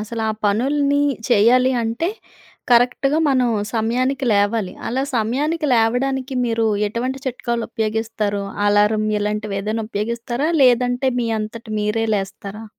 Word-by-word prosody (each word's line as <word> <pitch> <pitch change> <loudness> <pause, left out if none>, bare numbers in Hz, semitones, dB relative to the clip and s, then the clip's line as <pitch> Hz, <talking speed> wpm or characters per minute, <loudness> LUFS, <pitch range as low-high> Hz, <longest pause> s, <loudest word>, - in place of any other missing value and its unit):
అసల 225 +2 -5
ఆ - - -1
పనుల్ని 280 +7 +1 0.3
చెయ్యాలి 250 +3 +4
అంటే, 230 +9 -1 0.6
కరెక్ట్‌గా 250 +5 +3
మనం 255 -3 +2 0.2
సమయానికి 255 +5 0
లేవాలి. 205 -1 +1 0.2
అలా 260 +3 -1
సమయానికి 290 +8 0
లేవడానికి, 255 +4 0
మీరు 225 -1 0 0.2
ఎటువంటి 255 +5 -3
చిట్కాలు 235 -2 -2
ఉపయోగిస్తారు? 215 -2 -2 0.2
అలారం 210 +1 +3
ఇలాంటివి 210 -1 -2
ఏదైనా 215 +2 -2
ఉపయోగిస్తారా? 235 +6 -2
లేదంటే 250 +1 +3
మీ 235 - -1
అంతట 215 +2 -6
మీరే 210 +2 0
లేస్తారా? 200 +2 -6
230 Hz, 115 wpm, -20 LUFS, 215-255 Hz, 0.6 s, చెయ్యాలి